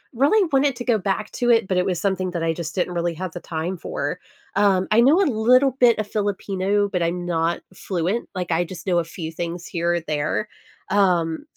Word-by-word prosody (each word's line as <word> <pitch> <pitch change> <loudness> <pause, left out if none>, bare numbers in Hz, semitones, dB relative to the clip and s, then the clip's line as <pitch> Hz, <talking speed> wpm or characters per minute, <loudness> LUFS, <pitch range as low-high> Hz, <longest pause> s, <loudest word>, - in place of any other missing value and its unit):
really 335 - +3
wanted 275 0 +3
to 245 - -6
go 230 -4 +2
back 200 +3 -2
to 240 0 -1
it, 225 -4 +4
but 190 - 0
it 180 0 +2
was 180 -3 -1
something 190 -2 -1
that 170 -2 -3
I 165 - +1
just 165 -1 -6
didn't 180 -1 -1
really 170 -1 -1
have 185 +1 -5
the 175 - -7
time 170 +3 -4
for. - - -4 0.4
Um, 195 -2 +3
I 225 - +6
know 285 +9 +5
a 395 - +4
little 255 +1 +4
bit 240 -3 +5
of 215 - -1
Filipino, 205 -1 0
but 180 -3 -2
I'm 175 +1 -1
not 170 -1 0
fluent. 185 +4 -2
Like, 180 -1 -3
I 165 +2 +2
just 175 0 -9
know 175 -2 +2
a - - 0
few 165 -1 -7
things 170 +1 -5
here 170 0 -1
or - - 0
there. 155 +6 -2 0.4
Um, 180 - +2
185 Hz, 225 wpm, -22 LUFS, 170-215 Hz, 0.4 s, I